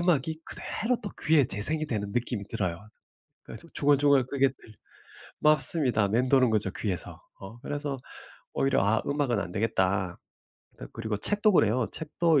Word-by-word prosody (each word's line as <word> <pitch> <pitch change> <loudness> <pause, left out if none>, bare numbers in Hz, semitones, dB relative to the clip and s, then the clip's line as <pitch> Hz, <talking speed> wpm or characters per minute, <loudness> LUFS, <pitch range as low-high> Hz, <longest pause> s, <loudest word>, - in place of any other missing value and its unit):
음악이 160 -2 0
그대로 240 +3 -2
또 205 - -5
귀에 150 -2 +4
재생이 155 +11 +1
되는 105 -6 -3
느낌이 120 -4 -3
들어요. 95 +1 -4 0.6
그래서 - - -10
중얼중얼 140 -2 +3
그게 135 0 +2
들 120 -4 -17 0.7
맞습니다. 145 -7 +4
맴도는 125 +3 +3
거죠 105 -3 0
귀에서. 95 -5 -4 0.2
어 100 +5 -11
그래서 145 0 -4 0.6
오히려 135 - +1
'아 110 +2 +2
음악은 140 -6 0
안 90 - -5
되겠다.' 95 -3 0 0.6
그 - - -9
그리고 110 -2 -4
책도 205 - +2
그래요. 115 - +2
책도 160 0 +1
130 Hz, 330 characters per minute, -27 LUFS, 105-150 Hz, 0.7 s, 귀에